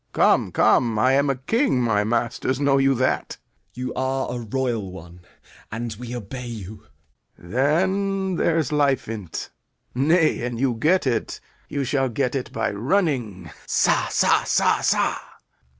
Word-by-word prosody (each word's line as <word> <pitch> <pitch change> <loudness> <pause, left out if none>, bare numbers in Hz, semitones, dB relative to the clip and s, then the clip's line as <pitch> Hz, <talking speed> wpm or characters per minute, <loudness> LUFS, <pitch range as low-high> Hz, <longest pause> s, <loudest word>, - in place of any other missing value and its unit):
Come, - - +3
come, 115 -3 +3
I 130 +5 +3
am 140 +1 +2
a 135 - +1
king; 220 - +1
My 115 -4 +1
masters, 120 +3 -1
know 140 -1 +3
you 135 0 +3
that? 130 +1 0
Gent. - - -8 0.4
You 125 0 -4
are 130 0 -2
a 120 - -4
royal 115 -4 -2
one, 90 -1 -12 0.5
and 115 +1 -4
we 125 0 -6
obey 120 +3 -7
you. 110 -1 -9 0.5
Lear. 85 - -15
Then 190 - +1
there's 160 -4 +1
life 145 -3 +1
in't. 105 -6 -6 0.4
Nay, 155 +5 +2
an 120 -1 -3
you 130 0 +1
get 155 +11 +2
it, 120 -4 -1 0.3
you 140 -1 -2
shall 135 0 0
get 125 +2 -1
it 135 -2 -3
by 115 -1 -1
running. 115 - -1 0.2
Sa, - - +2
sa, - - +3
sa, - - +2
sa! - - +1
125 Hz, 155 wpm, -23 LUFS, 115-140 Hz, 0.5 s, Come